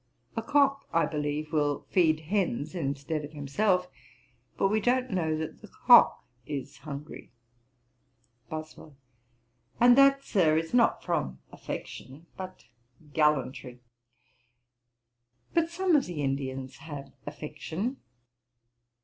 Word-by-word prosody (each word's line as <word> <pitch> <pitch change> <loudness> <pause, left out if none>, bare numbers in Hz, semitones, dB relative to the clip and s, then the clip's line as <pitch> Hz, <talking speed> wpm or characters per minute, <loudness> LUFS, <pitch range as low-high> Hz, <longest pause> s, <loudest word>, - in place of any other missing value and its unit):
A 225 - -1
cock, 275 +2 +2
I 165 0 +3
believe, 150 0 -3
will 145 -2 0
feed 160 -4 +3
hens 160 - -1
instead 145 -1 -3
of 145 +1 -9
himself; 180 +6 +1 0.7
but 195 - +2
we 215 +1 +1
don't 255 +2 +1
know 160 -4 0
that 155 0 -6
the - - -11
cock - - +5 0.2
is 140 +1 -6
hungry.' 150 -3 -8 1.2
BOSWELL. 155 -1 -8 0.8
'And 245 0 +7
that, 275 0 +6
Sir, 160 -6 +3
is 165 +4 -2
not 240 -1 +3
from 155 - -1
affection 140 +6 -8
but 185 -9 -9 0.5
gallantry. 135 -5 0 1.7
But 330 -1 +2
some 355 0 +2
of 280 - +2
the 155 -5 -4
Indians 135 -1 -3
have 145 -4 -9
affection.' 160 - -4
155 Hz, 115 wpm, -28 LUFS, 145-205 Hz, 1.7 s, And